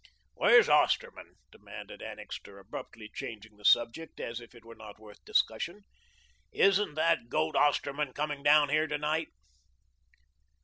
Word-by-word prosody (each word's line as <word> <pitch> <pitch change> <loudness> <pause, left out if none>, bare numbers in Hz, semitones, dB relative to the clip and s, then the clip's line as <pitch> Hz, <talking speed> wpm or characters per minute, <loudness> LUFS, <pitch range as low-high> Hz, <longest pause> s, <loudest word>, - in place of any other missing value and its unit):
"Where's - - +5
Osterman?" - - +1 0.2
demanded - - -11
Annixter, 100 - -9
abruptly 105 +2 -9
changing 110 -5 -8
the 105 - -19
subject 120 +9 +2
as 115 +1 -5
if 120 - -15
it 115 -1 -16
were 115 - -11
not 110 -2 -12
worth 105 -1 -16
discussion. - - -1 0.7
"Isn't 195 -5 +2
that 160 -6 +1
goat 80 -6 -1
Osterman 145 -1 +1
coming 145 -1 -3
down 145 0 +5
here 155 +2 +2
to 150 0 -2
night?" 155 +2 -1
140 Hz, 135 wpm, -30 LUFS, 110-150 Hz, 0.7 s, Where's